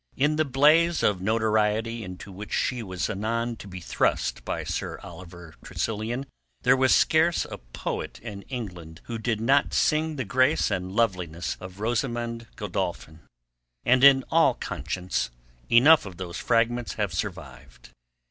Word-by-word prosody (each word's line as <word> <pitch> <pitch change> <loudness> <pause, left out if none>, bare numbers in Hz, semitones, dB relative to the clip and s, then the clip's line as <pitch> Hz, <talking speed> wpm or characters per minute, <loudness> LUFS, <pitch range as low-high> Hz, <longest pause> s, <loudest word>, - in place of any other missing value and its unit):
In 150 +3 +2
the 155 - +2
blaze 150 +5 +4
of 100 -3 +2
notoriety 110 +1 +1
into 90 +1 -9
which 100 +3 -9
she 125 -2 0
was 95 -4 -3
anon 115 +4 -2
to 105 - -11
be 95 -1 -8
thrust 85 - -1
by - - -3
Sir - - -4
Oliver 85 -1 -11
Tressilian 115 +5 -3 0.4
there - - +5
was 130 0 +4
scarce 160 +2 +3
a - - -8
poet - - -5
in 105 -4 -8
England 90 -10 -7
who 115 -1 -5
did 110 -1 -1
not 135 +5 +2
sing 155 0 +2
the 130 -3 -3
grace 130 +6 +2
and 95 -1 -2
loveliness 90 -7 -1
of 95 +1 -10
Rosamund 115 0 -2
Godolphin, 90 -6 -4 0.7
and 130 +2 +4
in 135 -1 +8
all - - +4
conscience 90 -2 -3 0.4
enough 140 +2 +6
of 90 -3 -10
those 90 -2 -6
fragments 120 +1 +1
have 105 -5 -2
survived. 70 - -7
110 Hz, 150 wpm, -26 LUFS, 90-125 Hz, 0.7 s, in